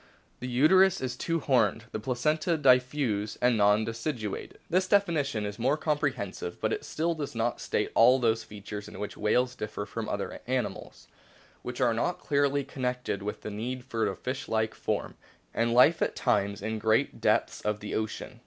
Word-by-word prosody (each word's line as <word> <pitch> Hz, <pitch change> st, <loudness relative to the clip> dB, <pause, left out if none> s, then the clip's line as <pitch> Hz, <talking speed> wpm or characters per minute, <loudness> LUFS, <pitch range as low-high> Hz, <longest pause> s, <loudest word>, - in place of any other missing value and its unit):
The 125 Hz, -, -5 dB
uterus 185 Hz, +10 st, +5 dB
is 125 Hz, -1 st, -3 dB
two 165 Hz, +5 st, -1 dB
horned; 115 Hz, -5 st, +2 dB
the -, -, -3 dB
placenta 150 Hz, +8 st, 0 dB
diffuse 125 Hz, -6 st, +2 dB
and 125 Hz, -1 st, +3 dB
non 105 Hz, +1 st, +4 dB
deciduate." 115 Hz, -2 st, -4 dB
This 185 Hz, +2 st, +1 dB
definition 155 Hz, -, +1 dB
is 105 Hz, +1 st, -6 dB
more 135 Hz, +6 st, +2 dB
comprehensive, 145 Hz, -, -2 dB
but -, -, 0 dB
it -, -, -3 dB
still 165 Hz, +2 st, -1 dB
does 145 Hz, -6 st, -5 dB
not 115 Hz, +1 st, -1 dB
state -, -, -1 dB
all 125 Hz, +3 st, +6 dB
those 115 Hz, -3 st, +1 dB
features 105 Hz, 0 st, -8 dB
in -, -, -10 dB
which 105 Hz, +1 st, -5 dB
whales 125 Hz, +4 st, +1 dB
differ 105 Hz, -2 st, -5 dB
from 110 Hz, +2 st, -5 dB
other -, -, -4 dB
animals, -, -, -3 dB, 0.5 s
which -, -, -6 dB
are -, -, +4 dB
not -, -, -1 dB
clearly 140 Hz, 0 st, +1 dB
con 135 Hz, -, -10 dB
nected 125 Hz, -5 st, -2 dB
with 105 Hz, +1 st, -5 dB
the 105 Hz, -, -6 dB
need 125 Hz, +4 st, -4 dB
for 115 Hz, -3 st, -1 dB
a -, -, -4 dB
fish 130 Hz, +2 st, -5 dB
like 110 Hz, 0 st, 0 dB
form -, -, -3 dB, 0.4 s
and 115 Hz, +1 st, +1 dB
life 125 Hz, +7 st, +5 dB
at -, -, 0 dB
times 100 Hz, -5 st, 0 dB
in 110 Hz, 0 st, -2 dB
great 110 Hz, +1 st, +1 dB
depths -, -, +1 dB
of 105 Hz, 0 st, -1 dB
the 105 Hz, -, -6 dB
ocean. 110 Hz, -1 st, -4 dB
120 Hz, 180 wpm, -28 LUFS, 105-140 Hz, 0.5 s, all